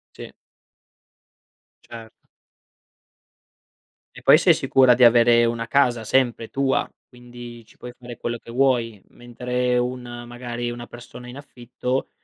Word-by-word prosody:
Sì. -, -, -10 dB, 1.6 s
Cer 115 Hz, -1 st, -11 dB, 2.0 s
E -, -, -13 dB
poi -, -, +7 dB
sei -, -, +4 dB
sicura 130 Hz, -2 st, +3 dB
di 125 Hz, 0 st, +5 dB
avere 120 Hz, 0 st, +5 dB
una 115 Hz, 0 st, -3 dB
casa 120 Hz, -3 st, +1 dB
sempre 120 Hz, -1 st, 0 dB
tua. 135 Hz, -1 st, -1 dB, 0.2 s
Quindi 120 Hz, -1 st, -12 dB
ci -, -, -23 dB
puoi 125 Hz, 0 st, -10 dB
fare 120 Hz, -1 st, -11 dB
quello 120 Hz, 0 st, -4 dB
che 115 Hz, -, -13 dB
vuoi, 120 Hz, -5 st, 0 dB
mentre 125 Hz, +1 st, -3 dB
un 125 Hz, +1 st, -2 dB, 0.3 s
magari 120 Hz, 0 st, -6 dB
una 120 Hz, 0 st, -8 dB
persona 120 Hz, +1 st, -12 dB
in 125 Hz, -, -10 dB
affitto, 125 Hz, -1 st, -5 dB
120 Hz, 130 wpm, -22 LUFS, 120-125 Hz, 2.0 s, poi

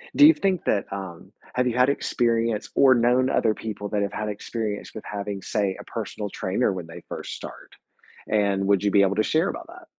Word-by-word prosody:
Do 295 Hz, -, +8 dB
you 320 Hz, -, +8 dB
think 190 Hz, -, 0 dB
that, 100 Hz, -, +1 dB
um, 95 Hz, -4 st, -7 dB, 0.2 s
have 125 Hz, 0 st, +2 dB
you 120 Hz, -, -1 dB
had 125 Hz, +1 st, +5 dB
experience 115 Hz, -5 st, 0 dB
or 135 Hz, -1 st, +7 dB
known 125 Hz, +2 st, +3 dB
other 110 Hz, -2 st, +2 dB
people 105 Hz, -2 st, -5 dB
that 105 Hz, -1 st, 0 dB
have 100 Hz, -, -3 dB
had 105 Hz, 0 st, -3 dB
experience 105 Hz, 0 st, -4 dB
with 110 Hz, -, -7 dB
having, 100 Hz, -1 st, -4 dB
say, 100 Hz, -2 st, -1 dB
a -, -, -8 dB
personal 105 Hz, -1 st, -5 dB
trainer 100 Hz, +4 st, 0 dB
when 90 Hz, -3 st, -6 dB
they 85 Hz, -, -11 dB
first -, -, -6 dB
start? -, -, -10 dB, 0.6 s
And 100 Hz, -2 st, +1 dB
would 100 Hz, -1 st, +3 dB
you 100 Hz, -, +2 dB
be 100 Hz, -, +5 dB
able 100 Hz, +1 st, +2 dB
to 110 Hz, -, +2 dB
share 160 Hz, -, +1 dB
about 340 Hz, -, -6 dB
that? 345 Hz, 0 st, -13 dB
105 Hz, 215 wpm, -25 LUFS, 100-125 Hz, 0.6 s, Do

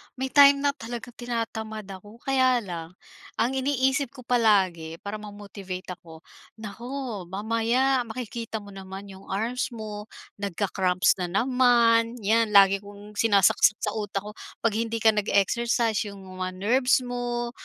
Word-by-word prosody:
may 265 Hz, 0 st, -4 dB
time 280 Hz, -1 st, +7 dB
na 285 Hz, -, +3 dB
talagang 240 Hz, -2 st, -8 dB
tinatamad 225 Hz, -2 st, -4 dB
ako. 205 Hz, +4 st, -12 dB
Kaya 255 Hz, -3 st, +2 dB
lang, 170 Hz, -2 st, -7 dB, 0.4 s
ang 240 Hz, -, +1 dB
iniisip 265 Hz, 0 st, 0 dB
ko 255 Hz, -, -11 dB
palagi 195 Hz, -9 st, +2 dB
para 210 Hz, +1 st, -5 dB
ma-motivate 200 Hz, -3 st, -8 dB
ako, 165 Hz, -2 st, -12 dB, 0.3 s
"Naku, 230 Hz, 0 st, -6 dB
mamaya 230 Hz, +7 st, +1 dB
makikita 225 Hz, -2 st, -5 dB
mo 200 Hz, -, -12 dB
naman 195 Hz, +1 st, -9 dB
'yong 190 Hz, +1 st, -14 dB
arms 225 Hz, +6 st, -1 dB
mo, 210 Hz, -1 st, -7 dB, 0.3 s
nagka-cramps 190 Hz, -2 st, +1 dB
na 180 Hz, -, -1 dB
naman." 235 Hz, +2 st, +3 dB
'yan, 220 Hz, +1 st, +2 dB
lagi 195 Hz, 0 st, +7 dB
kong 205 Hz, +1 st, -13 dB
sinasakak 200 Hz, -4 st, +4 dB, 0.2 s
sa 210 Hz, -, -1 dB
utak 205 Hz, -2 st, -3 dB
ko, 210 Hz, -, -7 dB, 0.3 s
"'Pag 230 Hz, -, +3 dB, 0.2 s
hindi 230 Hz, 0 st, -4 dB
ka 220 Hz, -, +7 dB
nag-e-exercise, 220 Hz, +2 st, +1 dB
'yong 200 Hz, -1 st, -9 dB
mga 185 Hz, 0 st, -5 dB
nerves 250 Hz, +7 st, +2 dB
mo. 240 Hz, -1 st, -3 dB
220 Hz, 140 wpm, -26 LUFS, 200-245 Hz, 0.4 s, time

